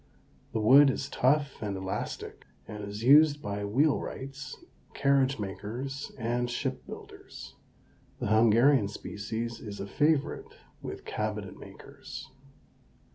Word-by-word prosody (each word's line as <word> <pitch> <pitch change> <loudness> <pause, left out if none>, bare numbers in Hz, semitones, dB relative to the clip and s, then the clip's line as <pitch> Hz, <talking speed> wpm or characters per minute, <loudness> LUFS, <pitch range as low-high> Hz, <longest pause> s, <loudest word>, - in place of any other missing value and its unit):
The 110 - -1
wood 135 +6 +7
is 135 +1 -2
tough 140 +2 +1
and 100 -3 -3
elastic, 95 0 -5 0.2
and 105 -1 -7
is 100 +2 -6
used 145 +3 +7
by 100 -5 -4
wheel 140 +9 +2
wrights, 135 0 -7 0.4
carriage 140 -1 +3
makers, 115 +7 -5
and 120 +1 -1
ship 120 - -3
builders. - - -10 0.6
The - - -4
Hungarian 115 +2 +5
species 110 +3 -5
is 105 -2 -8
a 100 - -3
favorite 150 +7 +1 0.3
with - - -7
cabinet - - -3
makers. - - -11
120 Hz, 120 wpm, -29 LUFS, 105-140 Hz, 0.6 s, wood